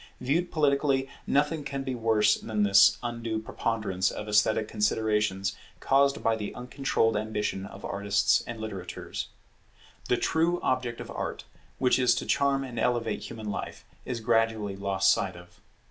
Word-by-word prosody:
Viewed 170 +7 0
politically, 140 -3 +2 0.2
nothing 145 +2 +1
can 140 -1 -4
be 130 -1 -3
worse 110 -3 +3
than 110 -2 -1
this 100 +1 +6
undue 115 -2 -3
preponderance 110 -3 -1
of 105 - -6
esthetic 105 +1 +2
considerations 105 -2 0 0.2
caused 140 +1 +2
by 115 - +3
the 105 -2 -5
uncontrolled 125 -3 0
ambition 105 -2 -2
of 100 0 -10
artists 100 +1 +2
and 115 -1 -6
litterateurs. 100 -5 -6 0.8
The 125 - +3
true 170 +5 +1
object 125 -2 -1
of - - -8
Art, - - -4 0.3
which 125 0 +3
is 125 -2 +4
to - - -3
charm 140 -1 +2
and 125 -4 -6
elevate 120 -2 0
human 110 -2 -5
life, - - -6 0.2
is 120 -3 -4
gradually 115 -3 +1
lost 95 0 +2
sight 95 -2 -2
of. 85 0 -15
115 Hz, 150 wpm, -28 LUFS, 105-130 Hz, 0.8 s, this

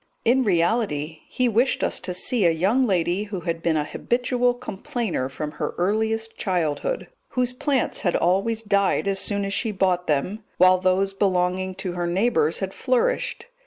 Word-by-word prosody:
In 255 +3 +4
reality, 170 -5 0
he 255 - +1
wished 240 +3 +1
us - - 0
to 185 -1 -4
see 205 +1 +2
a - - +5
young 200 +11 +2
lady 180 +1 0
who 200 -4 -5
had 165 0 -3
been 165 -2 +1
a 150 - +1
habitual 245 - 0
complainer 215 - -3
from 150 +3 -5
her - - -4
earliest 220 +4 0
childhood; 180 - -1 0.2
whose 250 -1 -1
plants 270 0 0
had 175 - +1
always 195 +6 +1
died 200 -1 +1
as 195 -1 +1
soon 200 0 -1
as 195 - -3
she 220 +1 0
bought 185 -3 0
them, 180 +9 -1
while 185 0 +6
those 185 +1 +1
belonging 185 -1 0
to 190 -1 -4
her 175 0 -2
neighbours 175 -4 +1
had 190 0 -3
flourished. 260 - 0
195 Hz, 170 wpm, -23 LUFS, 175-225 Hz, 0.2 s, while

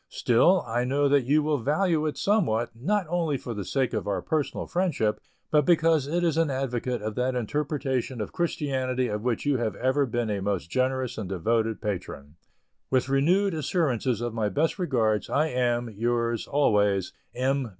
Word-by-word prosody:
Still, 170 +10 +3
I 120 +1 -1
know 140 +3 +1
that 140 -3 +3
you 150 +4 +3
will 150 -2 0
value 155 - +1
it 150 - -3
somewhat, 150 - +1
not 190 - 0
only 165 -4 0
for 120 - -6
the 105 -2 -4
sake 130 +6 -1
of 110 -2 -2
our 100 - -1
personal 155 -3 -2
friendship, 150 - 0 0.3
but 150 -1 +4
because 160 -3 +3
it 175 +4 0
is 165 -2 +1
an 165 -2 +2
advocate 125 -3 -2
of 110 0 -3
that 125 +3 -1
interpretation 135 0 -2
of 105 - -4
Christianity 130 -7 -1
of 105 0 -3
which 120 +2 -1
you 145 -2 +2
have 115 -2 -2
ever 130 +2 +1
been 120 -2 -1
a 100 -1 -2
most 95 -3 -2
generous 130 -2 -1
and 100 -4 -5
devoted 110 +4 0
patron. 85 -8 -5 0.6
With 130 0 +1
renewed 175 +9 +2
assurances 135 - 0
of 120 -1 -3
my 110 -2 0
best 160 - 0
regards, 115 - 0
I 155 +3 +1
am, 120 -2 0
yours, 115 +1 -1
always, 105 -9 +2 0.2
M. 130 0 0
130 Hz, 180 wpm, -26 LUFS, 115-150 Hz, 0.6 s, but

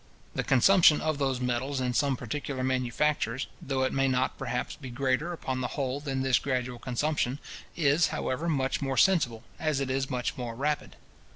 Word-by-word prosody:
The - - -1
consumption 155 +4 +6
of 155 -2 -1
those 135 -2 0
metals 125 +2 -1
in 125 -1 0
some 140 0 +1
particular 130 +2 -4
manufactures, 130 0 0 0.2
though 135 -1 -1
it 130 - 0
may 135 0 +2
not 130 0 +1
perhaps 125 -2 -3
be 135 -4 -9
greater 130 +6 0
upon 130 -6 -3
the 125 - 0
whole 135 -1 -1
than 135 -2 -2
this 130 -1 +3
gradual 125 -3 -2
consumption, 130 +1 -1 0.4
is, 155 0 +3
however, 150 +7 -2
much 135 -4 0
more 135 -1 -1
sensible, 125 -9 +3 0.2
as 155 -3 0
it 135 -1 -1
is 135 0 -1
much 125 -2 -2
more 120 -2 -4
rapid. 145 +4 -2
135 Hz, 180 wpm, -28 LUFS, 125-145 Hz, 0.4 s, consumption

